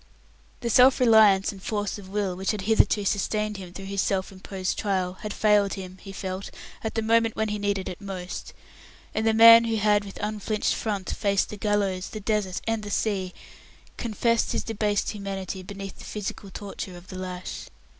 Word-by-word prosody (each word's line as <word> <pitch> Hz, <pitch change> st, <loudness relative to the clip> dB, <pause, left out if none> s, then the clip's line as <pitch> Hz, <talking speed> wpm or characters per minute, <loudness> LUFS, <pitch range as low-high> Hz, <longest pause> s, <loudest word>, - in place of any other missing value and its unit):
The 235 Hz, -, -1 dB
self 255 Hz, +3 st, +6 dB
reliance 220 Hz, -5 st, +6 dB
and 195 Hz, -2 st, -12 dB
force 205 Hz, 0 st, -2 dB
of 190 Hz, -2 st, -12 dB
will 200 Hz, -2 st, -1 dB
which 190 Hz, +1 st, -3 dB
had 210 Hz, -3 st, 0 dB
hitherto 210 Hz, 0 st, +3 dB
sustained 210 Hz, +1 st, 0 dB
him 185 Hz, -2 st, -9 dB
through 195 Hz, +2 st, -8 dB
his 195 Hz, 0 st, -1 dB
self 190 Hz, -1 st, -1 dB
imposed 190 Hz, 0 st, -4 dB
trial 185 Hz, -3 st, 0 dB
had 210 Hz, -, -4 dB
failed 205 Hz, -1 st, +3 dB
him 185 Hz, -1 st, -8 dB
he 195 Hz, -, -9 dB
felt 190 Hz, 0 st, -5 dB, 0.3 s
at 220 Hz, -, -3 dB
the 225 Hz, -, 0 dB
moment 225 Hz, 0 st, +3 dB
when 220 Hz, 0 st, 0 dB
he 210 Hz, 0 st, -2 dB
needed 200 Hz, -2 st, -1 dB
it 180 Hz, -, -7 dB
most; 185 Hz, -2 st, -6 dB, 0.6 s
and 220 Hz, +1 st, 0 dB
the 220 Hz, -, +4 dB
man 230 Hz, +1 st, +9 dB
who 225 Hz, -1 st, 0 dB
had 210 Hz, -1 st, +3 dB
with 200 Hz, -1 st, -10 dB
unflinched 210 Hz, 0 st, -1 dB
front 200 Hz, -4 st, -3 dB
faced 200 Hz, -1 st, +1 dB
the -, -, -6 dB
gallows, 200 Hz, -3 st, 0 dB
the 215 Hz, -, -6 dB
desert, 205 Hz, -3 st, -1 dB
and 225 Hz, -1 st, 0 dB
the 210 Hz, -, -7 dB
sea, 195 Hz, -3 st, -1 dB, 0.7 s
confessed 230 Hz, 0 st, +1 dB
his -, -, -1 dB
debased 210 Hz, -2 st, 0 dB
humanity 195 Hz, -2 st, -5 dB
beneath 195 Hz, +1 st, -8 dB
the -, -, -10 dB
physical 205 Hz, -1 st, -5 dB
torture 190 Hz, -2 st, -7 dB
of 175 Hz, +1 st, -15 dB
the 185 Hz, -, -7 dB
lash. 185 Hz, -1 st, -6 dB
205 Hz, 190 wpm, -26 LUFS, 190-215 Hz, 0.7 s, man